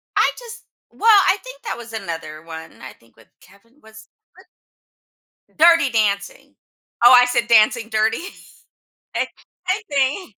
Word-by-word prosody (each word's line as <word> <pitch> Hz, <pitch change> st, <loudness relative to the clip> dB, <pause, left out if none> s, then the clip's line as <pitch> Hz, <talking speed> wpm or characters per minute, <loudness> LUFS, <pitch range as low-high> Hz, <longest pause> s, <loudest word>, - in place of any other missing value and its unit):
I -, -, +2 dB
just 475 Hz, -1 st, -11 dB, 0.3 s
well, 450 Hz, -, 0 dB, 0.2 s
I 385 Hz, -, +3 dB
think -, -, -13 dB
that -, -, -5 dB
was 235 Hz, -1 st, -11 dB
another 165 Hz, -7 st, -7 dB
one. 160 Hz, -1 st, -11 dB
I 130 Hz, -, -10 dB
think 115 Hz, -, -28 dB
with 115 Hz, -, -21 dB
Kevin 230 Hz, +8 st, -24 dB
was 220 Hz, 0 st, -16 dB, 0.3 s
what -, -, -19 dB, 1.1 s
Dirty 330 Hz, -3 st, +4 dB
Dancing. 205 Hz, -4 st, -2 dB, 0.5 s
Oh, 240 Hz, -, +8 dB
I 250 Hz, 0 st, +7 dB
said 245 Hz, -1 st, -1 dB
Dancing 225 Hz, 0 st, +3 dB
Dirty? 220 Hz, 0 st, 0 dB, 1.0 s
I -, -, -1 dB, 0.4 s
I 380 Hz, +4 st, -1 dB
think. 280 Hz, -, -1 dB
230 Hz, 145 wpm, -19 LUFS, 200-295 Hz, 1.1 s, Oh